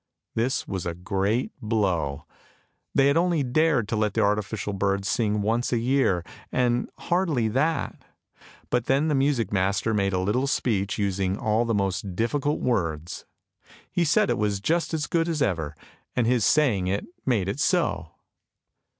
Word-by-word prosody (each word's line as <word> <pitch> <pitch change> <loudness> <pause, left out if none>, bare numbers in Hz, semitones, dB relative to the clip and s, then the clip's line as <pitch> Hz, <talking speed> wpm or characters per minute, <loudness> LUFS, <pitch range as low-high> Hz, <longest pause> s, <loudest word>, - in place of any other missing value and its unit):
This 125 +5 -1
was 95 -3 -3
a 85 - -3
great 100 +6 -1
blow! 90 -10 -1 0.7
They 140 +1 +5
only 170 -2 +2
dared 135 -3 +2
to - - 0
let 105 -1 0
the - - +2
artificial 105 0 0
bird 100 0 0
sing 105 -1 0
once 115 +4 0
a 120 - +2
year, 115 -8 +1 0.3
and 125 -1 +1
hardly 165 -10 0
that; 150 +7 -1 0.7
but 120 -1 +1
then 140 +5 +2
the - - +2
music 135 -7 +1
master 100 +3 +1
made 100 -2 +1
a - - +1
little 105 +9 0
speech 105 -7 0
using 95 -2 0
all 110 +2 +1
the 115 -1 0
most 95 -1 -2
difficult 145 +7 0
words. 85 -9 -2 0.7
He 175 - +1
said 195 +7 +3
it - - -1
was 105 -2 0
just 165 - 0
as 155 -2 -1
good 165 0 0
as 160 -2 -1
ever, 80 - -1 0.4
and 120 - +2
his 120 -3 +2
saying 115 -12 +3
it 100 +2 -1 0.2
made 110 -8 +1
it 100 +8 -3
so. 160 - +1
110 Hz, 160 wpm, -25 LUFS, 100-135 Hz, 0.7 s, They